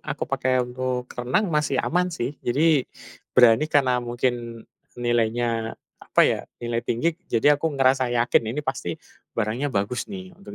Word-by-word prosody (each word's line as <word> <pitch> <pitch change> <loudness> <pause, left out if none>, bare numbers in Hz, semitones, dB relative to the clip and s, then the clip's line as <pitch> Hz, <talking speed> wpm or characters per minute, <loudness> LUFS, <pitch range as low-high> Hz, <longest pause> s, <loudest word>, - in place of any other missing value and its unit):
aku - - -5
pakai 130 -1 +1
untuk 125 0 -3
renang 130 - 0
masih 150 -3 +1
aman, 180 +2 +1
sih. 145 -5 -4
Jadi, 145 +2 +2 0.5
berani 125 +3 +6
karena 130 -4 +3
mungkin 120 -1 -3 0.3
nilainya, 115 -1 0 0.2
apa - - 0
ya, - - +3 0.2
nilai 120 0 -1
tinggi 135 +9 +1 0.2
jadi 145 +6 +3
aku 160 0 -1
ngerasa 130 -1 +3
yakin. 120 0 +3
Ini 150 - -1
pasti 130 -11 -3 0.4
barangnya 115 +6 -1
bagus 105 +4 -1
nih. 185 -2 -8
Untuk 200 +1 -11
125 Hz, 150 wpm, -24 LUFS, 120-145 Hz, 0.5 s, berani